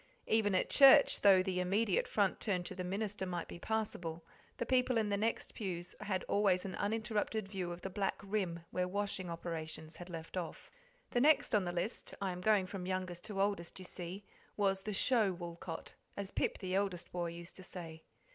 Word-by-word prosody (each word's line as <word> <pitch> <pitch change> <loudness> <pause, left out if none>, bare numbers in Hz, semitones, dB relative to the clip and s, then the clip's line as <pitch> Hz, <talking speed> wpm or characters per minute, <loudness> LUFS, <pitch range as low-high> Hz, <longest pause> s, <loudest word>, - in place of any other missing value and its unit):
Even 210 -3 +3
at - - +2
church, 280 +1 +8
though 190 -2 +7
the 185 -1 -1
immediate 220 - +2
front - - +1
turned 185 -5 0
to - - -5
the 185 - -4
minister 200 +2 -2
might 175 -1 -3
be - - -8
passable, 175 -7 -2 0.3
the 235 - -1
people 250 -1 +3
in 215 -2 +1
the 200 - +2
next 220 +3 -1
pew 180 -5 -3 0.2
had 190 -2 -1
always 195 -3 +2
an 190 - -4
uninterrupted 215 0 -1
view 190 -3 -3
of 175 0 -7
the 190 - -4
black 195 +1 -1
rim 195 -4 -1
where 180 0 0
washing 195 -1 -2
operations 160 -1 -5
had 175 +1 -9
left 165 +1 -6
off. 175 -3 -5 0.4
The 245 - +2
next 290 -2 +5
on 205 -3 +4
the 175 - -1
list 175 +5 -3
I 195 -2 -1
am 180 0 -6
going 205 -1 +4
from 185 -1 -5
youngest 185 -2 -3
to 205 -3 -4
oldest, 200 -4 0
you 185 - -8
see 180 +3 -6 0.3
was 195 -2 +2
the 210 - -4
"show" 215 -1 +3
Woolcot, 170 -1 -7 0.2
as 200 -1 -4
Pip, - - 0
the 185 -2 -4
eldest 190 -3 -1
boy, 175 -1 -1
used 170 +1 -8
to - - -10
say. 165 -3 -7
190 Hz, 200 wpm, -35 LUFS, 175-210 Hz, 0.4 s, church